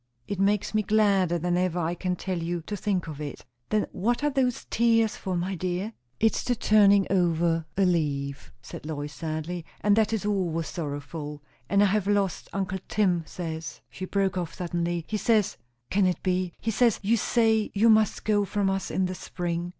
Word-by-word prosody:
It 200 - -3
makes 200 +1 +1
me 215 - +3
gladder 200 -4 +3
than 175 +1 0
ever 180 -1 0
I 170 0 0
can 180 +1 -2
tell 185 0 -3
you, 170 +1 -2
to 205 - -4
think 195 -2 -1
of 155 -2 -7
it." 145 -1 -6 0.2
"Then 215 -1 +2
what 235 +8 0
are 295 - +2
those 255 -3 0
tears 225 -1 +3
for, 185 -2 -3
my 180 +3 -2
dear?" 185 +4 -2 0.3
"It's 220 -2 +2
the 245 - +1
turning 205 -3 +5
over 170 -3 +2
a 195 - +4
leaf," 140 -6 -1
said - - -9
Lois 150 -1 -4
sadly, 160 +2 -4 0.2
"and 205 -1 +4
that 220 -1 +2
is 220 -2 -1
always 180 -6 0
sorrowful. 145 -1 -5 0.3
And 200 0 +4
I - - +6
have 200 0 +1
lost 200 -3 0
uncle 190 -1 -2
Tim 180 -5 +1
says," 160 -2 -6
she 185 - -6
broke 190 -1 0
off 170 -3 -5
suddenly, 170 -1 -2
"he 215 - -1
says, 215 -2 +2 0.4
can 195 -1 +3
it 180 - -2
be? 185 -1 0
he 225 - -1
says 235 0 +3
you 220 +4 +3
say 225 -1 +2
you 215 +3 +4
must 220 -2 +3
go 210 -1 +3
from 200 -1 0
us 195 0 -2
in 190 - 0
the 185 - -2
spring?" 175 -1 -3
185 Hz, 195 wpm, -27 LUFS, 170-210 Hz, 0.4 s, I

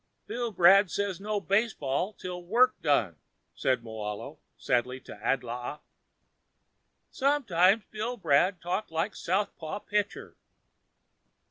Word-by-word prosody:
"Billbrad 200 -5 +4
say 200 +2 -1
no 210 0 -1
baseball 195 - 0
until 180 -2 -7
work 245 +8 +4
done," 110 - +1 0.4
said 130 -3 0
Moahlo 105 -2 -6 0.2
sadly 125 +1 0
to - - -10
Adlaa. 125 +2 -2 1.3
"Sometimes 225 -8 +3
Billbrad 195 -6 +1
talk 185 +5 -2
like 165 +5 -2
southpaw 185 -2 -2
pitcher." 205 0 -3
180 Hz, 95 wpm, -29 LUFS, 140-210 Hz, 1.3 s, Billbrad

